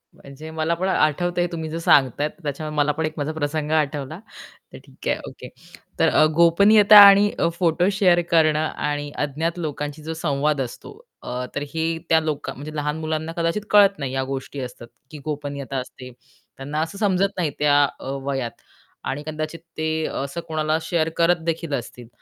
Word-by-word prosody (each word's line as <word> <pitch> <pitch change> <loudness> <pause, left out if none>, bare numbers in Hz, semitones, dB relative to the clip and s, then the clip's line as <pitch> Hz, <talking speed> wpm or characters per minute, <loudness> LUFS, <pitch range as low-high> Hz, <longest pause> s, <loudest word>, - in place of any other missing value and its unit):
म्हणजे 140 +3 -11
मला 160 +1 -1
पण 185 +3 -2
आठवतंय 175 +1 +1
हे - - 0
तुम्ही 160 -2 -5
जे 165 +2 -4
सांगताय 145 -2 +3
त्याच्यामुळे 150 -1 -6
मला 150 0 +3
पण 160 +2 -2
एक 155 - -3
माझा 145 +1 -2
प्रसंग 150 0 -2
आठवला, 150 0 -1 0.5
तर - - -8
ठीक - - -11
आहे. - - +1
ओके. - - -11 0.5
तर - - +4
अ, 155 - +4
गोपनीयता 200 +5 +6
आणि 200 +1 +6 0.3
फोटो 175 +1 +2
शेअर 185 -3 +3
करणं 155 -2 +4
आणि 145 0 -3
अज्ञात 160 +5 -3
लोकांशी 150 -1 -5
जो 160 - -4
संवाद 150 -2 0
असतो 125 -2 -7 0.3
अ, 125 +1 -4
तर 145 - -2
हे 160 0 -1 0.2
त्या 160 - +5
लोक 155 -2 -3
म्हणजे 150 +3 -9
लहान 150 +1 -2
मुलांना 160 0 -3
कदाचित 170 +5 0
कळत 200 -2 +6
नाही 135 -3 -4
या 135 0 0
गोष्टी 135 +1 -5
असतात 125 -1 -8 0.2
की 155 - -8
गोपनीयता 140 -2 -4
असते. 125 0 -8 0.5
त्यांना 145 +3 -3
असं 160 +5 -4
समजत 195 -1 +1
नाही 165 -5 0
त्या 145 -1 +4 0.2
अ, - - -10 0.2
वयात 135 -4 -4 0.4
आणि 145 +2 -3
कदाचित 155 +1 -4 0.2
ते 160 0 -1 0.2
असं 140 +5 -5
कोणाला 155 -1 0
शेअर 160 0 0
करत 170 0 +2
देखील 165 -2 -2
असतील. 120 -2 -5
155 Hz, 175 wpm, -22 LUFS, 145-165 Hz, 0.5 s, गोपनीयता